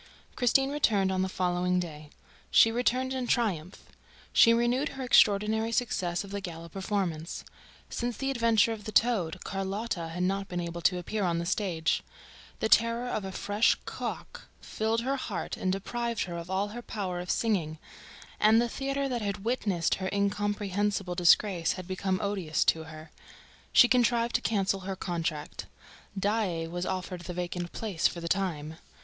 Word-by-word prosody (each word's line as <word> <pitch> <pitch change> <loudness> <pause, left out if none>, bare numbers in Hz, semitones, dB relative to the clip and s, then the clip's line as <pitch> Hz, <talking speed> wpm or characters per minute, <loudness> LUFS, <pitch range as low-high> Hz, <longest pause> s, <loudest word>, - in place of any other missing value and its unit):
Christine 270 +2 +3
returned 210 -10 +2
on 185 0 0
the 190 - 0
following 180 0 0
day. 155 -4 -6 0.4
She 225 - +6
returned 250 +2 0
in 255 -2 -2
triumph. 190 -8 -1 0.5
She 230 - +7
renewed 240 +5 +2
her 265 - -3
extraordinary 220 -1 +4
success 185 -8 0
of 200 - -11
the 200 0 -3
gala 170 -2 -7
performance. 190 -4 -3 0.4
Since 240 -2 -3
the 270 0 -1
adventure 230 -4 +3
of 215 -1 -9
the 215 - -4
"toad," 190 -8 +2
Carlotta 195 -2 -3
had 175 +2 -3
not 195 +1 0
been 180 - -3
able 170 0 -4
to 180 +1 +3
appear 205 +4 -3
on 170 -2 +1
the 170 - -2
stage. 170 -4 0 0.6
The - - +2
terror 230 +2 +3
of 215 - -2
a 190 - -5
fresh 205 +3 +2
"co - - -3
ack" - - -13 0.2
filled 220 +1 -1
her 270 +3 -1
heart 215 -7 -4
and 185 - -1
deprived 235 +4 -2
her 175 -2 -6
of 170 +1 -6
all 195 +2 0
her 240 +3 -7
power 190 -6 -4
of 180 0 -6
singing; 175 -9 0 0.6
and 220 +1 +6
the 240 - +2
theater 275 +3 -2
that 245 -3 -2
had 200 0 -3
witnessed 200 -8 0
her 190 - -1
incomprehensible 200 -1 0
disgrace 175 0 +3
had 185 -2 -8
become 190 0 -1
odious 190 -6 0
to 160 0 +1
her. 160 0 -11 0.6
She 245 - +8
contrived 240 -1 +2
to - - +2
cancel 195 -2 0
her 190 0 -5
contract. 165 -4 -4 0.5
Daae 195 -5 0
was 175 +2 -4
offered 185 -1 -4
the 175 0 -7
vacant 175 0 -4
place 200 -7 0
for 170 - -6
the 170 - -5
time. 160 -5 -2
195 Hz, 170 wpm, -29 LUFS, 175-225 Hz, 0.6 s, She